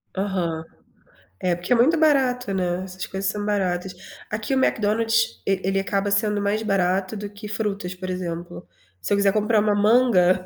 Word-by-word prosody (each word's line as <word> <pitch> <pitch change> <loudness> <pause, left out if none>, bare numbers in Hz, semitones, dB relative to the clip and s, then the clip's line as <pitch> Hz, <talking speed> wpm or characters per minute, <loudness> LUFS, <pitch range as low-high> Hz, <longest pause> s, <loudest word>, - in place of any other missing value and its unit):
Aham. 185 -5 -2 0.8
É 180 -1 +1
porque 175 +8 -1
é - - +5
muito 275 +8 +4
barato, 260 -8 +2
né, 180 -1 -1
essas 185 0 -6
coisas 195 0 -2
são 210 - -4
baratas. 185 -3 -1 0.4
Aqui 215 +5 -3
o 265 - +2
Mcdonald's 225 0 +1
e 195 -1 +2
ele 195 +1 +1
acaba 200 +1 -1
sendo 210 0 +1
mais 205 +2 0
barato 195 0 0
do 205 0 -6
que 205 +1 -10
frutas, 200 -4 -3
por 185 0 -6
exemplo. 175 - -6 0.3
Se - - -5
eu - - +3
quiser 200 0 +3
comprar 215 0 +2
uma 210 0 +2
manga, 205 -4 +4
200 Hz, 180 wpm, -23 LUFS, 185-215 Hz, 0.8 s, é